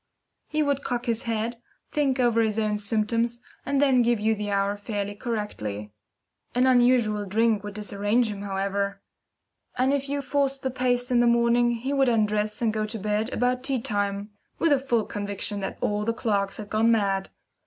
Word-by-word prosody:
He 305 0 0
would 285 -1 0
cock 245 -1 -2
his 230 -2 -1
head, 230 +1 -2 0.3
think 275 -3 +1
over 235 -2 +3
his 220 -1 0
own 210 -1 0
symptoms, 230 +3 0 0.3
and 280 0 +1
then 270 -3 +4
give 240 -1 +2
you 220 +1 +2
the 210 -1 -4
hour 200 0 +1
fairly 205 -1 -4
correctly. 205 - -4 0.6
An 250 +1 +4
unusual 240 -5 +3
drink 220 +1 +2
would 205 -1 -7
disarrange 210 +3 0
him, 205 -2 -5
however; 200 0 -2 0.8
and 260 +2 +2
if 280 -1 -1
you 285 0 -2
forced 275 0 0
the 260 - -1
pace 245 0 +1
in 245 - +4
the 240 - +4
morning, 235 0 +3
he 240 +4 -2
would 270 -2 +3
undress 210 -1 0
and 220 -2 +2
go 215 -1 -1
to 225 +1 -4
bed 210 +3 -1
about 250 +1 0
tea 265 -1 -1
time, 205 -1 -2 0.3
with 330 - +2
a 285 - +5
full 240 -5 0
conviction 205 0 -2
that 195 - -4
all 210 0 0
the 230 +2 0
clocks 200 -4 0
had 210 -1 -8
gone 220 +2 +3
mad. 195 -3 +1
225 Hz, 185 wpm, -26 LUFS, 205-245 Hz, 0.8 s, a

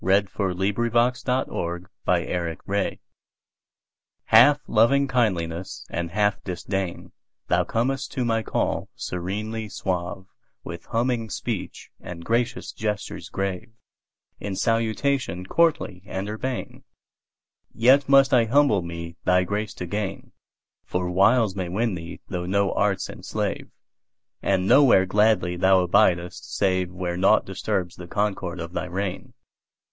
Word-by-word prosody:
1860 105 +6 +1
To 90 -8 -2 0.2
My - - +2 0.3
Cat 100 +2 -2 1.3
HALF 135 +6 +7
loving 135 +6 +3
kindliness 95 -8 -1
and 85 -1 -2
half 105 +2 0
disdain, 95 0 -4 0.4
Thou - - +3
comest 125 +3 -1
to 125 - -1
my 115 -1 +1
call - - -1
serenely 105 +5 -4
suave, 95 -1 -3 0.4
With 85 -1 -8
humming 115 -1 -1
speech - - -5
and 85 -1 -9
gracious 120 +1 -1
gestures 105 -3 -4
grave, 95 +4 -3 0.7
In 100 -2 -4
salutation 115 -3 0
courtly 130 - +1
and 95 +1 -4
urbane; 120 +4 -5 0.9
Yet 135 +4 +4
must 135 -1 +6
I 120 -3 +5
humble 125 -4 +3
me 85 0 -7
thy 90 0 +3
grace 105 +3 -3
to 90 - -5
gain, 100 +1 -4 0.5
For 90 0 -2
wiles 100 +2 +4
may 95 -3 -3
win 110 +4 0
thee 85 -1 -7
though 90 -2 -4
no 100 +1 +1
arts 100 -1 0
enslave, - - -4 0.7
And 95 -1 +1
nowhere 125 -9 +6
gladly 95 -3 +2
thou 95 0 +4
abidest 90 0 +1
saveWhere 90 -2 0
naught 95 - +4
disturbs 90 -2 -3
the 90 - -9
concord 95 -3 -2
of 85 +1 -6
thy - - -2
reign. 100 +7 -4
100 Hz, 120 wpm, -24 LUFS, 90-115 Hz, 1.3 s, HALF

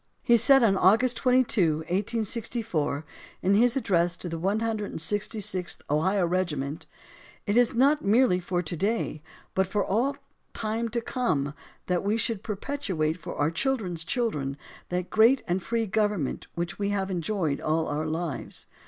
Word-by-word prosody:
He 235 - +5
said, 250 +3 +6
on 200 -4 +4
August 225 +7 +4
22, 235 - +3
1864, 200 - -1 0.4
in 190 +2 +3
his 240 +5 +4
address 175 -8 +1
to 180 - -5
the 165 0 -4
166th 205 -2 -1
Ohio 185 +5 +2
Regiment: 160 -5 -2 0.6
It 205 -1 0
is 245 +1 +4
not 280 +5 +3
merely 210 -2 +4
for 180 0 -2
to 170 +1 -5
day, 195 -3 -1 0.3
but 190 0 +1
for 200 0 0
all 260 +8 0 0.4
time 225 +1 -2
to 235 +1 -2
come, 155 - -1 0.3
that 180 0 0
we 205 +3 +1
should 225 -3 -1
perpetuate 200 - -2
for 170 - -7
our 150 +2 +1
children's 185 -6 -1
children 150 - -2 0.3
that 180 0 -3
great 230 +5 +5
and 180 +2 0
free 230 +3 -1
government 210 -8 -1
which 175 +3 -4
we 200 0 0
have 195 -1 -1
enjoyed 170 -4 -1
all 160 +1 0
our 150 +2 -2
lives. 160 -2 -4
195 Hz, 150 wpm, -27 LUFS, 170-230 Hz, 0.6 s, said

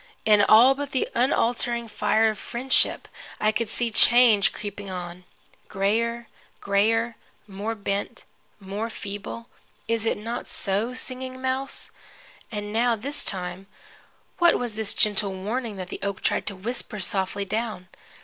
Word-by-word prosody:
In 210 -1 +6
all 225 +6 +7
but 280 0 -6
the 260 - +1
unaltering 240 -1 +1
fire 220 +1 +2
of 215 - -9
friendship 260 +3 0 0.3
I 215 - +3
could 225 0 -2
see 235 0 0
change 230 -3 +6
creeping 205 -1 -7
on. 180 -1 -7 0.4
Grayer, 230 +4 -1 0.3
grayer, 225 +4 +1 0.3
more 205 +3 -4
bent, 200 +2 -3 0.4
more 205 +3 -4
feeble 205 +2 -7 0.4
is 230 -1 0
it - - +1
not 230 +3 -5
so, 210 +5 +1
Singing 255 0 -6
Mouse? 260 +1 -3 0.6
And 210 -1 -5
now, 235 +1 +2
this 280 +7 +1
time, 185 0 -4 0.7
what 345 -1 +5
was 240 -3 -3
this 215 -1 -1
gentle 205 -2 +2
warning 220 +4 -3
that 185 -2 -7
the - - -6
oak 200 -1 -3
tried - - 0
to 200 - -3
whisper 215 +2 -4
softly 190 +1 -1
down? 215 -3 -3
220 Hz, 140 wpm, -25 LUFS, 200-235 Hz, 0.7 s, all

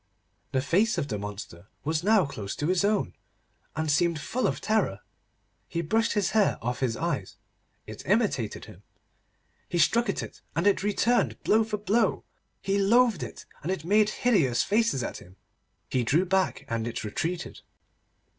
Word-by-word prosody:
The 130 -1 0
face 200 +10 +2
of 145 -4 -2
the 105 -3 -2
monster 100 -3 -8 0.2
was 155 +2 -1
now 210 -2 +4
close 105 -8 -6
to 145 - -3
his 185 +3 +2
own, 205 0 +1 0.6
and 155 0 0
seemed 165 +1 +2
full 240 +13 -1
of - - -2
terror. 205 - 0 0.7
He 170 - -2
brushed 225 +8 +1
his 205 -3 +1
hair 215 -2 +3
off 125 +2 -3
his 120 -4 0
eyes. - - -3 0.5
It 110 0 -9
imitated 190 - 0
him. - - -14 0.9
He 175 - -1
struck 230 +8 +3
at - - -1
it, - - -10
and 170 - 0
it 205 - +3
returned 220 +4 +1
blow 220 +1 +4
for 215 -1 -3
blow. 210 +3 +1 0.4
He 195 +1 +1
loathed 225 -1 +4
it, - - -7 0.2
and 170 - -2
it 185 -5 -3
made 210 +3 +4
hideous 175 - +2
faces 215 - +1
at - - -4
him. 90 +1 -15 0.5
He 125 - 0
drew 155 +10 +2
back, 190 0 0
and 115 0 -2
it 120 - -4
retreated. 165 +12 -4
175 Hz, 170 wpm, -27 LUFS, 130-210 Hz, 0.9 s, now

